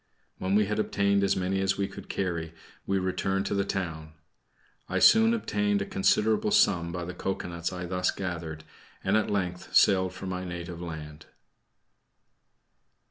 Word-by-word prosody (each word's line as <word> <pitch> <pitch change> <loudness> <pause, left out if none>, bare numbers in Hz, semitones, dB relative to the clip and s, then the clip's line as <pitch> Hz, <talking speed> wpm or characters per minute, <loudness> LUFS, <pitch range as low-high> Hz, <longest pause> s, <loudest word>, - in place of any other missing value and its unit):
When 95 +2 0
we 105 0 +4
had 105 +1 -2
obtained 100 -1 +2
as 100 0 +2
many 95 +1 -1
as 95 0 +1
we 100 -1 0
could 100 0 -11
carry, 85 -4 -3 0.3
we 100 - +1
returned 95 +1 -1
to - - -1
the 100 -1 +1
town. 80 -5 -4 0.8
I - - -1
soon 225 +1 +6
obtained 105 - 0
a 100 - -2
considerable 105 +3 +2
sum 85 -5 +3
by 90 0 -4
the 90 - -6
cocoanuts 90 -2 -3
I 90 -1 -5
thus 90 0 0
gathered, 85 -4 -4 0.4
and - - +2
at 110 - +2
length 90 -3 -3
sailed 95 -2 +5
for 95 - -7
my 90 -1 -3
native 85 -1 -6
land. 80 -2 -8
95 Hz, 160 wpm, -28 LUFS, 85-100 Hz, 0.8 s, soon